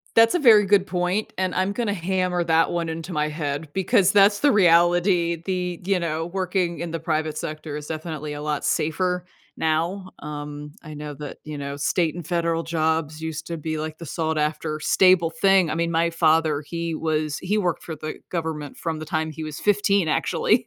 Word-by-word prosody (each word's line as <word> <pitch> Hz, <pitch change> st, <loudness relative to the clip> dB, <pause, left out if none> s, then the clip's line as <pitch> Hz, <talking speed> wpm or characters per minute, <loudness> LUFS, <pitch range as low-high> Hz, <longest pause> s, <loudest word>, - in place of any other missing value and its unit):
That's 225 Hz, 0 st, +6 dB
a -, -, +3 dB
very 220 Hz, -7 st, +7 dB
good 195 Hz, -1 st, +4 dB
point, 180 Hz, +3 st, -1 dB
and 185 Hz, -1 st, 0 dB
I'm 185 Hz, +2 st, 0 dB
gonna 215 Hz, -1 st, -1 dB
hammer 180 Hz, -1 st, 0 dB
that 165 Hz, 0 st, +3 dB
one 170 Hz, -1 st, -1 dB
into 165 Hz, +3 st, -5 dB
my 150 Hz, -2 st, 0 dB
head 150 Hz, 0 st, -3 dB
because 190 Hz, +1 st, +3 dB
that's 205 Hz, 0 st, +5 dB
the 290 Hz, -, +4 dB
reality. 175 Hz, -3 st, +3 dB
The, 180 Hz, -2 st, -2 dB
you 190 Hz, -1 st, +1 dB
know, 165 Hz, -1 st, -2 dB
working 180 Hz, -1 st, -1 dB
in 170 Hz, -, -4 dB
the 165 Hz, 0 st, -4 dB
private 155 Hz, -1 st, -1 dB
sector 155 Hz, -1 st, -5 dB
is 150 Hz, 0 st, -7 dB
definitely 155 Hz, -2 st, -5 dB
a 145 Hz, 0 st, -6 dB
lot 150 Hz, -1 st, -2 dB
safer 180 Hz, +3 st, 0 dB, 0.3 s
now. 170 Hz, +5 st, -1 dB
Um, 150 Hz, 0 st, -7 dB
I 155 Hz, -2 st, -9 dB
know 150 Hz, 0 st, -6 dB
that, 145 Hz, 0 st, -8 dB
you 150 Hz, -1 st, -6 dB
know, 140 Hz, 0 st, -5 dB
state 155 Hz, +3 st, 0 dB
and 175 Hz, -3 st, -7 dB
federal 170 Hz, -1 st, 0 dB
jobs 160 Hz, -2 st, -1 dB
used 160 Hz, 0 st, -5 dB
to 170 Hz, -, -3 dB
be, 155 Hz, 0 st, -3 dB
like, 155 Hz, 0 st, -5 dB
the 170 Hz, -, -8 dB
sought 160 Hz, +1 st, -2 dB
after 155 Hz, 0 st, -2 dB
stable 185 Hz, 0 st, +4 dB
thing. 190 Hz, +1 st, +3 dB
I -, -, -1 dB
mean, 170 Hz, +1 st, 0 dB
my 170 Hz, 0 st, +2 dB
father 160 Hz, -2 st, +2 dB
he 170 Hz, +1 st, -3 dB
was 155 Hz, -2 st, -1 dB
he 205 Hz, +4 st, -1 dB
worked 180 Hz, -4 st, -1 dB
for 160 Hz, -, -5 dB
the 155 Hz, +1 st, -6 dB, 0.2 s
government 160 Hz, -4 st, -4 dB
from 165 Hz, -2 st, -3 dB
the 155 Hz, -, -6 dB
time 155 Hz, +1 st, -1 dB
he 155 Hz, +1 st, -6 dB
was 155 Hz, -1 st, -6 dB
15, 200 Hz, -3 st, +2 dB
actually. -, -, +1 dB
165 Hz, 200 wpm, -23 LUFS, 155-180 Hz, 0.3 s, very